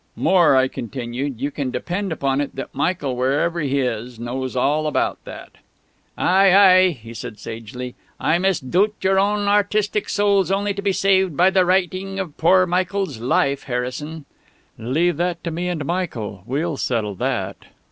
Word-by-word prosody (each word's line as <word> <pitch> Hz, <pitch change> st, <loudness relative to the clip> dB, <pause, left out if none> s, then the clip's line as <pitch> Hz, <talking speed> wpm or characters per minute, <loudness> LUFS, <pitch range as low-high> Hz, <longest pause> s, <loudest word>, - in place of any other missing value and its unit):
"More," 175 Hz, -7 st, +4 dB
I 130 Hz, 0 st, +4 dB
continued, 125 Hz, +1 st, -5 dB
"you 145 Hz, -, -2 dB
can 140 Hz, -2 st, -3 dB
depend 180 Hz, +8 st, -3 dB
upon 140 Hz, -3 st, 0 dB
it 145 Hz, -, -5 dB
that 135 Hz, -, -6 dB
Michael, 140 Hz, -3 st, -1 dB
wherever 145 Hz, +7 st, 0 dB
he 140 Hz, -2 st, 0 dB
is, 120 Hz, -1 st, -3 dB
knows 130 Hz, +2 st, -4 dB
all 150 Hz, +4 st, +1 dB
about 150 Hz, -, -1 dB
that." -, -, -10 dB, 0.7 s
"Ay, 190 Hz, +1 st, +4 dB
ay," 185 Hz, -2 st, +7 dB
he 115 Hz, -8 st, -9 dB
said 115 Hz, -2 st, -7 dB
sagely, 115 Hz, +3 st, -7 dB, 0.3 s
"I 170 Hz, -, +2 dB
misdoubt 190 Hz, +3 st, +1 dB
your 190 Hz, 0 st, +3 dB
own 205 Hz, +1 st, +1 dB
artistic 205 Hz, 0 st, +1 dB
soul's 200 Hz, -3 st, +2 dB
only 200 Hz, +1 st, 0 dB
to 200 Hz, -, -5 dB
be 200 Hz, -1 st, +1 dB
saved 190 Hz, -4 st, +2 dB
by 185 Hz, +2 st, +5 dB
the 190 Hz, -1 st, +3 dB
writing 190 Hz, +1 st, 0 dB
of 175 Hz, -6 st, -5 dB
poor 185 Hz, +3 st, +4 dB
Michael's 185 Hz, -, -1 dB
'Life,' 135 Hz, +3 st, 0 dB
Harrison." 135 Hz, +5 st, -4 dB, 0.5 s
"Leave 145 Hz, +9 st, 0 dB
that 175 Hz, 0 st, -2 dB
to 170 Hz, -, -3 dB
me 175 Hz, +3 st, -3 dB
and 160 Hz, -5 st, -3 dB
Michael; 130 Hz, -, -3 dB
we'll 145 Hz, +4 st, -2 dB
settle 110 Hz, -6 st, -1 dB
that. 95 Hz, -, -2 dB
160 Hz, 165 wpm, -21 LUFS, 130-190 Hz, 0.7 s, ay